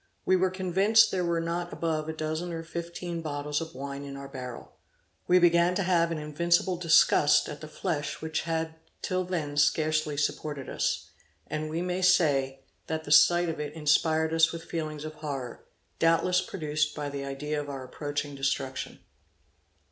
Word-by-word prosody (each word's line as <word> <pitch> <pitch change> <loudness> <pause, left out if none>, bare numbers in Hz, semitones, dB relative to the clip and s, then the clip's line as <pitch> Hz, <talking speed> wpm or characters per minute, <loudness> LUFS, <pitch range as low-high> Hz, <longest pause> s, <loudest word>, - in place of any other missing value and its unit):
We 185 - +4
were 185 0 +2
convinced 190 +4 +3
there 185 -1 0
were 170 -1 0
not 170 +1 -3
above 160 -2 -2
a - - -2
dozen 160 +2 -3
or 165 0 -4
fifteen 170 +1 -5
bottles 145 -1 -2
of 165 -2 -7
wine 140 +1 -6
in 140 -1 -7
our 140 0 -8
barrel. 125 -3 -8 0.6
We 180 - +6
began 175 0 +4
to 195 - +1
have 170 -2 +2
an 165 - -2
invincible 170 +4 +1
disgust 165 -3 +4
at 150 - -7
the 155 - -7
flesh 155 -1 -3
which 160 0 -2
had 160 -1 -2 0.3
till 185 0 0
then 160 -6 -3
scarcely 155 0 +2
supported 145 -1 -2
us; - - -2 0.3
and 155 0 -4
we 165 +3 -2
may 180 +1 -2
say, 145 -8 +3 0.3
that 160 0 -3
the 145 - -7
sight 175 +3 +6
of 165 -2 -3
it 150 -1 -4
inspired 160 +1 +2
us 165 0 +4
with 165 0 -7
feelings 155 -3 -4
of 155 - -6
horror, 140 -6 -6 0.3
doubtless 165 +2 +3
produced 150 -4 -2
by 150 -1 -3
the 140 -1 -5
idea 145 +2 -3
of 145 - -8
our 135 -2 -5
approaching 145 +2 -4
destruction. 135 -1 -3
160 Hz, 175 wpm, -28 LUFS, 145-170 Hz, 0.6 s, We